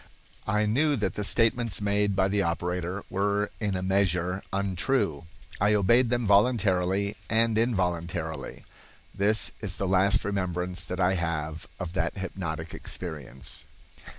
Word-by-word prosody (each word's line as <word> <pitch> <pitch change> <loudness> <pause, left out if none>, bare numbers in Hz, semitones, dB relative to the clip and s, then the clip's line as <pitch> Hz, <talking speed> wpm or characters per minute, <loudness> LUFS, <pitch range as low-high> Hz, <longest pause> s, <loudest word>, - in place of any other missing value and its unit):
I 105 0 +2
knew 145 +8 +3
that 105 -7 -1
the 105 - -3
statements 115 +1 +2
made 100 0 +1
by 95 0 +3
the 100 +1 +1
operator 90 +2 -2
were 100 +2 0
in 105 -3 -1
a 90 - -2
measure 95 -1 +1
untrue. 95 - 0 0.3
I 105 +2 +3
obeyed 115 +5 +4
them 120 -1 0
voluntarily 100 -2 +2
and 115 0 +3
involuntarily. 90 -8 -1 0.5
This 105 +1 +3
is 100 -4 -4
the 95 - -1
last 100 +4 +3
remembrance 90 -2 -2
that 90 0 -5
I 90 +1 +3
have 80 -2 -3
of 90 -2 -5
that 85 0 -1
hypnotic 85 -4 -5
experience." 70 -7 -5
95 Hz, 135 wpm, -27 LUFS, 90-105 Hz, 0.5 s, obeyed